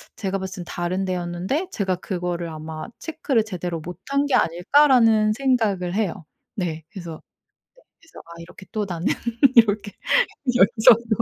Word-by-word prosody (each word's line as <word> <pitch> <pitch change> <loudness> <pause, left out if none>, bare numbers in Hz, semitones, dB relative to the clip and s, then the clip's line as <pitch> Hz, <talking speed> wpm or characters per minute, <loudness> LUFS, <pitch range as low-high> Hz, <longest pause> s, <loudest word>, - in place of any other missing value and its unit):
제가 195 -1 -2
봤을 190 -1 -6
땐 - - -15
다른 180 +2 -2
데였는데 185 - -2
제가 190 -3 -1
그거를 175 -2 -4
아마 155 +2 -7
'체크를 295 -7 -1
제대로 180 -5 -4
못한 185 - -3
게 285 - +1
아닐까?'라는 220 - +4
생각을 215 -8 0
해요. 195 -5 -2 0.3
네. 165 -4 -3
그래서 170 -6 -8 0.6
네 - - -28
그래서 330 - -15
아 170 - -15
이렇게 170 +3 -12
또 215 -2 -2
나는 170 0 -3 0.5
이렇게 210 -3 +4 0.6
여기저기로 225 +1 +5
190 Hz, 320 characters per minute, -23 LUFS, 175-225 Hz, 0.6 s, 여기저기로